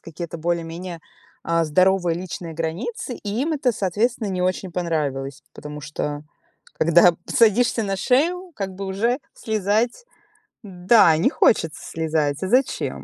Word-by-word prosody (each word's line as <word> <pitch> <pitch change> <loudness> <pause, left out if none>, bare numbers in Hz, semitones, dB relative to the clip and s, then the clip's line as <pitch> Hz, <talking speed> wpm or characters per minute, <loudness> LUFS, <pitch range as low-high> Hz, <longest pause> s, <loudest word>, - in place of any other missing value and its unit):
какие-то 170 0 -7
более-менее, 170 +1 -3 0.4
а, 165 0 +1
здоровые 180 +2 +2
личные 170 -2 -6
границы, 185 +10 -4
и 205 +3 -4
им 320 - -1
это, 275 -5 +1
соответственно, 215 +3 -1
не 185 -1 -2
очень 185 0 -1
понравилось. 145 -6 -2
Потому 150 0 -8
что, 145 0 -4 0.5
когда 170 +2 +5
садишься 230 +1 +3
на 195 -2 -2
шею, 340 - +1
как 195 -2 -4
бы 195 +1 -6
уже 225 +7 0 0.2
слезать 220 - -1 0.6
да, 180 -3 +4
не 170 - +3
хочется 165 -8 +2
слезать, 155 -3 -1
а - - -1
зачем? 255 +6 0
185 Hz, 135 wpm, -22 LUFS, 165-220 Hz, 0.6 s, когда